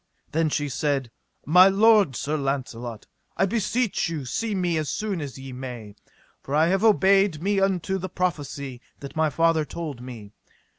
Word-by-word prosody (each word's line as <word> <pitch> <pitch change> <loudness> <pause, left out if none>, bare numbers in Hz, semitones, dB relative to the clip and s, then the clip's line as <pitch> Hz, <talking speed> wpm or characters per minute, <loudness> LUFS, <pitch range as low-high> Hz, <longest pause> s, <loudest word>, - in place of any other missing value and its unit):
Then 160 0 +1
she 145 0 -1
said: 135 -2 -1 0.3
My 180 +5 +7
lord 205 - +4
Sir 150 +5 -2
Launcelot, 125 -5 -4 0.3
I - - +3
beseech 225 -1 0
you 155 -5 -4
see 215 - -2
me 180 -3 0
as 155 -3 -3
soon 205 -2 -2
as 140 -4 -6
ye 135 -1 -9
may, 125 -5 -7 0.5
for 140 - -4
I 160 +2 +4
have 195 +3 +1
obeyed 195 -5 +4
me 195 +4 +1
unto 190 0 0
the 185 +1 -5
prophecy 145 -8 -3 0.2
that 140 0 -9
my 160 0 +2
father 165 +2 +2
told 150 -5 -6
me. 115 -5 -9
155 Hz, 165 wpm, -25 LUFS, 135-190 Hz, 0.5 s, My